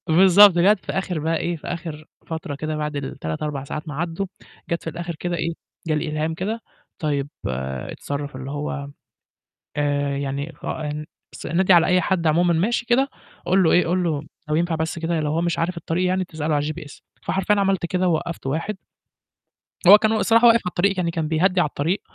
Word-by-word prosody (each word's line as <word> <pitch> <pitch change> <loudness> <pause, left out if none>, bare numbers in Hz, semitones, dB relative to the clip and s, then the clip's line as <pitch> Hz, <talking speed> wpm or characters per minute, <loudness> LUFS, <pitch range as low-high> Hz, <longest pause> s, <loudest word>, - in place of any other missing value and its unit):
بالضبط، 185 +3 +7
جَت 200 +3 +5
في - - -3
آخر 185 -3 -2
بقى 160 +2 0
إيه 175 +2 -2
في - - -11
آخر 165 -3 -5 0.2
فترة 160 -3 -4
كده 155 +2 -3
بعد 150 -1 -3
ال3 135 - -4
4 145 -3 -3
ساعات 150 +3 -6
ما 150 - -5
عدّوا، 170 +4 -2 0.4
جَت 170 - -1
في - - -3
الآخر 170 +1 -5
كده 175 +2 -3
إيه، 165 +1 -1 0.3
جَه 155 - +1
الإلهام 155 +1 -1
كده، 210 +7 -3 0.4
طيب 145 -2 -1 0.2
اتصرف، 65 - -4
اللي 130 +1 -6
هو 145 -1 -4 0.9
آآ، 145 -1 0
يعني 140 +3 -3
ف - - -12
أن 150 0 -4 0.3
بس - - -8
نادي 185 +4 +3
على 170 -1 +6
أي 180 0 +4
حد 175 -1 0
عمومًا 170 +3 +3
ماشي 230 +8 0
كده، 260 +3 +3 0.4
قُل 190 +1 +4
له 165 - +4
إيه، 180 - +4
قُل 180 +2 +1
له 155 -4 -1 0.3
لو 150 - 0
ينفع 170 +1 +1
بس 160 +1 -2
كده 165 0 -1
لو 150 -1 -1
هو 160 +2 0
مش 170 0 0
عارف 170 +2 -1
الطريق 170 +2 -1
يعني 185 +1 +1
تسأله 155 -3 -2
على 145 0 0
الGPS 155 -3 -10 0.2
فحرفيًا 195 +2 +1
عملت 195 -3 +1
كده، 185 +1 0
ووقّفت 170 -2 -2
واحد 165 +9 -2 1.1
هو 200 +3 +11
كان 215 +1 +1
والصراحة 225 +2 +4
واقف 230 - +7
على - - -10
الطريق، 195 +3 +2
يعني 170 -2 0
كان 165 -2 -2
بيهدّي 180 +4 +2
على - - +2
الطريق، 160 +7 -1
165 Hz, 200 wpm, -23 LUFS, 150-180 Hz, 1.1 s, هو